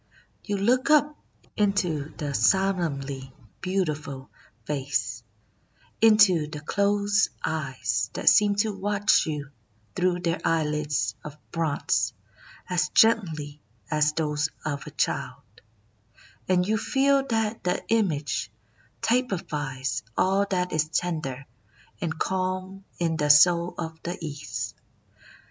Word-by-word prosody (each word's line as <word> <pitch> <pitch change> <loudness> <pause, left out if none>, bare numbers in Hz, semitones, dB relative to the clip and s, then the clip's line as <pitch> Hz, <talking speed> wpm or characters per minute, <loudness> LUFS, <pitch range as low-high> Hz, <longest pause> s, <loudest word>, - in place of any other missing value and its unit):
You 205 -1 -2
look 250 +8 +2
up 300 0 +4 0.4
into 180 -8 0
the 145 -2 -3
solemnly 140 -8 0 0.3
beauti 185 -4 0
ful 140 -3 -9 0.3
face, 135 -5 -2 0.4
— - - -35
into 205 -8 +6
the 150 0 -7
closed 200 +5 +1 0.2
eyes 130 - -2
that - - -5
seem 205 -1 +6
to 215 - -2
watch 205 0 +2
you 145 -3 -4 0.4
through 180 -1 +1
their 170 +1 -1
eyelids 150 -2 0
of 150 -1 -9
bronze 140 -9 0 0.5
as 180 -1 0
gently 155 -10 +2 0.3
as 150 0 +2
those 150 -1 0 0.2
of 145 -2 -3
a - - -5
child, - - -2 0.6
— 110 +3 -28
and 180 0 +3
you 220 0 +1
feel 275 +2 +2
that 225 -2 -1
the 180 0 -1
image 145 - 0 0.5
typifies 160 - -1 0.2
all 195 +2 +2
that 180 -1 0
is 155 0 +1
tender 155 -6 -2 0.6
and 160 -2 -2
calm 185 +2 -2
in 165 -2 0
the 150 -1 0
Soul 170 +4 +6
of 160 -1 -6
the 175 +2 -4
East. 110 - -5
165 Hz, 120 wpm, -26 LUFS, 145-195 Hz, 0.6 s, into